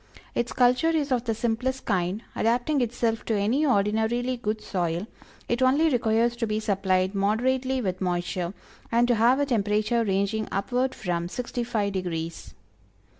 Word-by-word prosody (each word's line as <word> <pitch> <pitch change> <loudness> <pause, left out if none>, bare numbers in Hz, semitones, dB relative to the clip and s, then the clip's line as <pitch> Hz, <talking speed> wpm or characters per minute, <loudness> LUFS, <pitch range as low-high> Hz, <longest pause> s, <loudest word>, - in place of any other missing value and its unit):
Its 240 0 -1
culture 250 +6 +3
is 305 -4 0
of 250 -1 +1
the 225 -2 0
simplest 245 +3 -1
kind, 190 +2 -1
adapting 245 +5 +1
itself 230 -1 -1
to 225 - -1
any 235 +10 +1
ordinarily 225 +2 +1
good 220 -2 -2
soil, 175 -2 -2 0.4
it 240 +1 -1
only 280 +5 +4
requires 235 -1 +2
to 235 -1 -2
be 215 0 -1
supplied 190 -2 +1
moderately 255 +6 +1
with 185 -4 -3
moisture 175 -1 -1 0.4
and 235 +1 +3
to 245 - +3
have 240 +4 +4
a 285 - +2
temperature 215 -1 +1
ranging 200 +1 0
upward 250 +6 -1
from 175 -6 -2
sixty 245 +3 -3
five 215 -4 -1
degrees. 170 -3 -4
225 Hz, 155 wpm, -26 LUFS, 200-245 Hz, 0.4 s, only